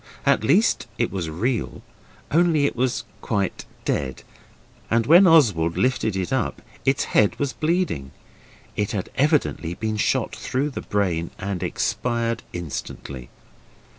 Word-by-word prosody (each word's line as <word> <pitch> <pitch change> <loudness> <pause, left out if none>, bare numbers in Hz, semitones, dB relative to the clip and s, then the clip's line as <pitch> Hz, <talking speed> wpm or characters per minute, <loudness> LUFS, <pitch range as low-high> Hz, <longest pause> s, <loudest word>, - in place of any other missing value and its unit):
At - - +3
least 180 - +3
it 115 - 0
was 90 -5 -3
real 110 +9 -2 0.5
only 160 -2 +4
it - - 0
was 120 -1 0 0.2
quite 100 -4 -2 0.2
dead 65 -2 -2 0.7
and 115 0 +2
when 175 +7 +7
Oswald 105 - +4
lifted 125 -5 +1
it 95 +4 -2
up 130 -5 -1 0.3
its 135 0 +2
head 105 -2 +2
was 140 -2 -1
bleeding. 155 - -1 0.7
It 105 - -1
had 100 -3 -3
evidently 140 - +1
been 110 +1 -2
shot - - 0
through 140 +3 -2
the - - -5
brain 90 -5 -1
and 95 -2 -3
expired 115 +5 -1
instantly. 70 -6 -6
115 Hz, 135 wpm, -23 LUFS, 90-140 Hz, 0.7 s, when